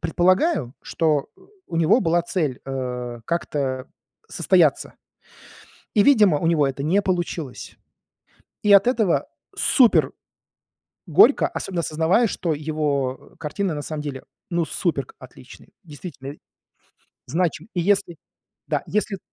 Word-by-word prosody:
Предполагаю, 175 - +1
что, 155 -4 0
э, - - -24 0.3
у 165 - -4
него 170 +9 +4
была 170 -2 +1
цель, 155 -7 -2
э, 125 -3 -5
как-то 140 -6 -2 0.4
состояться, - - +2 1.0
И, 210 - +5
видимо, 210 - +5
у 165 - -2
него 160 -4 +3
это 135 0 -4
не 180 +8 +2
получилось. 175 -7 -4 0.9
И 205 - +6
от 200 +3 +5
этого 220 -8 +1 0.3
супер 250 -5 +4 1.0
горько, - - +5
особенно 180 -3 -3
осознавая, 165 +8 +2
что 170 -3 -2
его, 145 -3 -2
э, - - -24
картины 165 +4 -3
на 145 - -5
самом 150 +1 -5
деле, 140 -3 -6 0.3
ну, 170 -1 0
супер 145 -8 -2
к - - -18
отличные, 130 +6 -15
действительно 145 -3 -9 0.9
значим 170 - -2
И 175 - 0
если 195 -1 +1 0.5
да, - - -1
если 210 -1 -1
165 Hz, 125 wpm, -22 LUFS, 140-185 Hz, 1.0 s, И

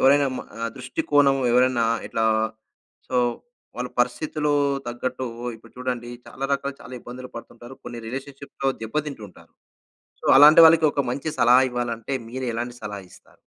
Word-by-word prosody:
ఎవరైనా 140 +1 +5
మ - - -4 0.4
దృష్టికోణం 145 - +2 0.2
ఎవరైనా 125 -1 +3 0.2
ఇట్లా 115 - -1 0.8
సో, 130 - -1 0.6
వాళ్ళ 125 0 -3
పరిస్థితిలో 150 +4 0 0.4
తగ్గట్టు 125 +2 -4 0.3
ఇప్పుడు 115 +1 -19
చూడండి 125 -1 -4 0.2
చాలా 135 - -6
రకాలు 140 0 -1
చాలా 125 - -10
ఇబ్బందులు 125 +2 -9
పడుతుంటారు. 120 +2 -10
కొన్ని 120 - -7
రిలేషన్షిప్‌లో 135 +2 -5
దెబ్బ 110 +6 -6
తింటు 135 -7 -7
ఉంటారు. - - -19 0.7
సో, - - -10
అలాంటి 150 +3 +9
వాళ్ళకి 160 -1 +5
ఒక 140 - 0
మంచి 140 +4 -3
సలహా 125 +2 +6
ఇవ్వాలంటే 120 +1 -3
మీరు 130 +1 -4
ఎలాంటి 120 +1 -4
సలహా 105 -1 -6
ఇస్తారు? - - -20
130 Hz, 140 wpm, -23 LUFS, 120-140 Hz, 0.8 s, అలాంటి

